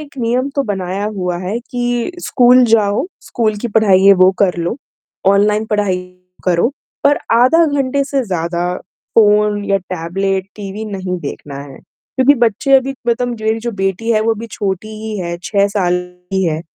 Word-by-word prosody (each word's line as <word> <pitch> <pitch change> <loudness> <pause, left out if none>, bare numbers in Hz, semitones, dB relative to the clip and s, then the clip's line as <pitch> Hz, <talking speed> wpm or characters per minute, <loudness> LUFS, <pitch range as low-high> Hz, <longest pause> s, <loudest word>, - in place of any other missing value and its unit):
एक 290 -2 -12
नियम 245 +3 0
तो 280 - +2
बनाया 195 -1 -3
हुआ 180 -2 -2
है 185 +5 -3
कि 245 +1 -1 0.2
स्कूल 250 0 +5
जाओ, 215 +2 +2 0.2
स्कूल 220 -3 -1
की 240 - -1
पढ़ाई 200 -4 +4
है 200 - +9
वो 185 - +7
कर 190 -3 +2
लो, 170 +7 -2 0.5
ऑनलाइन 210 +2 +3
पढ़ाई 205 -3 +1 0.5
करो, 180 +3 +2 0.4
पर 285 +1 +4
आधा 255 +9 +5
घंटे 280 -2 0
से 275 -1 -1
ज़्यादा 175 -2 -2 0.4
फोन 210 -1 +3
या 200 -1 +2 0.2
टैबलेट, 190 +3 -2
टीवी 205 +1 -6
नहीं 190 -3 -4
देखना 140 -1 -7
है 140 -1 -12
क्योंकि 255 - 0
बच्चे 240 +4 +1
अभी 270 +1 -1
मतलब 240 +1 +1
मेरी 220 +1 0
जो 235 +1 -3
बेटी 195 +4 -1
है 215 - +2
वो 225 +1 +2
अभी 225 +2 -7
छोटी 200 0 -3
ही 220 -1 -4
है, 170 -2 -3
6 200 -1 +2
साल 185 -4 0 0.4
की 190 0 +1
है, 160 -2 -1
210 Hz, 170 wpm, -16 LUFS, 185-235 Hz, 0.5 s, है